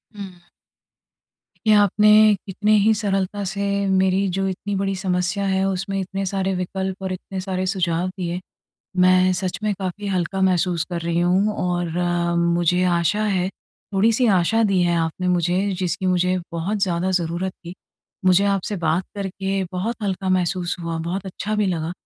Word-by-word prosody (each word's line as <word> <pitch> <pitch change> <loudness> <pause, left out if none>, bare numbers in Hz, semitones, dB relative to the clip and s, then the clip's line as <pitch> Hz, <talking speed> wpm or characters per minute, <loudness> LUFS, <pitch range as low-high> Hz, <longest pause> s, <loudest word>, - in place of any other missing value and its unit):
हुँ। 190 -3 -9 1.3
ये 215 - +6
आपने 210 +1 +4 0.4
कितने 205 +2 -1
ही 220 +2 +4
सरलता 200 -1 -1
से 195 +2 -3 0.3
मेरी 190 +1 +2
जो 195 0 0
इतनी 200 +2 -3
बड़ी 195 0 -1
समस्या 185 +1 -1
है, 190 0 +1
उसमें 195 +1 -2
इतने 195 +1 -3
सारे 195 0 -1
विकल्प 190 +1 -3
और 190 -1 -2
इतने 190 +1 -6
सारे 185 -1 -2
सुझाव 180 -2 0
दिए। 180 -2 -4 0.6
मैं 185 0 +5
सच 185 -1 -2
में 210 -1 +1
काफ़ी 195 +2 -4
हल्का 190 0 -1
महसूस 180 -2 +2
कर 175 -1 -3
रही 170 0 0
हूँ 185 +4 +2
और 175 -1 -1 0.5
मुझे 170 +1 +2
आशा 175 +4 +1
है 190 -3 0 0.4
थोड़ी-सी 225 +5 +3
आशा 225 +6 +2
दी 195 -3 +2
है 175 -1 +2
आपने 165 +2 -1
मुझे, 180 +3 +1
जिसकी 185 0 -1
मुझे 180 0 +2 0.2
बहुत 175 +6 -2
ज़्यादा 180 0 0
ज़रूरत 180 +1 -1
थी। 175 0 -11 0.5
मुझे 185 +2 +5
आपसे 200 +1 0
बात 170 +1 0
करके 195 -1 -2
बहुत 215 +6 -2
हल्का 190 -1 -2
महसूस 180 -1 0
हुआ, 165 -1 -3
बहुत 180 +4 -4
अच्छा 200 +3 -4
भी 210 - +2
लगा 170 -2 -2
185 Hz, 160 wpm, -22 LUFS, 180-195 Hz, 1.3 s, ये